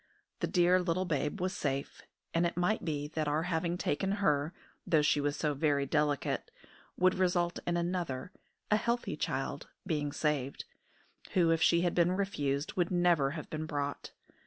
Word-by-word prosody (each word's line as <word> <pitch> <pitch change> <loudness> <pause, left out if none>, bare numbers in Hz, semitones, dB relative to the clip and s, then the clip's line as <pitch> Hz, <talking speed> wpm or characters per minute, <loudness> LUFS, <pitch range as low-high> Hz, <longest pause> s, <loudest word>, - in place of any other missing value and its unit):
The - - 0
dear 180 0 +4
little 180 +1 0
babe 150 +2 -1
was 185 +2 -1
safe; 140 -1 -3 0.3
and 165 - +2
it 170 - -6
might 180 +5 +1
be 150 -3 -2
that 155 -1 -2
our 150 +2 +1
having 170 0 -1
taken 190 +4 0
her, 150 -7 +1 0.4
though 160 -4 +4
she 150 0 +3
was 145 +1 -1
so 150 -1 0
very 145 -1 +1
delicate, 145 0 0 0.5
would 185 0 +4
result 175 -2 +1
in 175 0 +1
another, 170 -4 -2 0.4
a 210 - +6
healthy 235 +2 -1
child, - - -3 0.2
being 150 -5 -1
saved, 145 -3 -1 0.7
who, 170 -3 +4
if 165 -1 +2
she 170 +1 +5
had 175 -1 +1
been 175 +1 +3
refused, 150 -8 -1
would 175 -2 +1
never 175 -6 +3
have 155 - -6
been 155 0 -3
brought. 145 -2 -3
165 Hz, 170 wpm, -32 LUFS, 145-180 Hz, 0.7 s, a